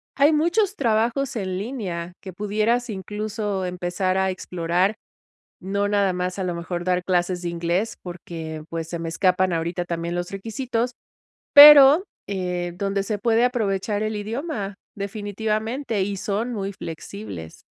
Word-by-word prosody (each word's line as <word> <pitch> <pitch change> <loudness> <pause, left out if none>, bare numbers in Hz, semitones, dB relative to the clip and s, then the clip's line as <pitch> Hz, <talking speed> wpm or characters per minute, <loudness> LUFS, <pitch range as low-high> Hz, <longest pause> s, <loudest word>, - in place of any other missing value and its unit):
Hay 290 +3 +5
muchos 355 +6 +2
trabajos 235 - +1
en 185 -3 -2
línea 185 -7 -4
que 190 -2 -8
pudieras 215 +5 0
incluso 210 0 -3
empezar 180 +1 -1
a 190 0 +2
explorar. 180 +2 0 0.7
No 200 +2 -1
nada 200 -2 +2
más, 180 +1 -3
a 190 - -1
lo 180 -1 -2
mejor, 175 +1 -4
dar 180 -1 0
clases 180 0 0
de 175 - -2
inglés, 170 +5 -1
porque, 165 -3 -7
pues, 165 -1 -4
se 170 0 -4
me 165 0 -4
escapan 185 +2 +2
ahorita 170 +2 -1
también 170 0 -3
los 175 0 -3
requisitos, 230 +4 -2 0.6
pero, 290 +2 +10 0.2
eh, 180 -3 -3
donde 195 +1 -1
se 205 +1 -3
puede 230 +2 +3
aprovechar 210 -4 -1
el 215 0 -2
idioma. 215 -1 -4 0.2
Definitivamente. 215 +3 -2
Y 200 +1 -2
son 210 +5 -2
muy 200 -2 -3
flexibles. 100 - -8
195 Hz, 145 wpm, -23 LUFS, 175-220 Hz, 0.7 s, pero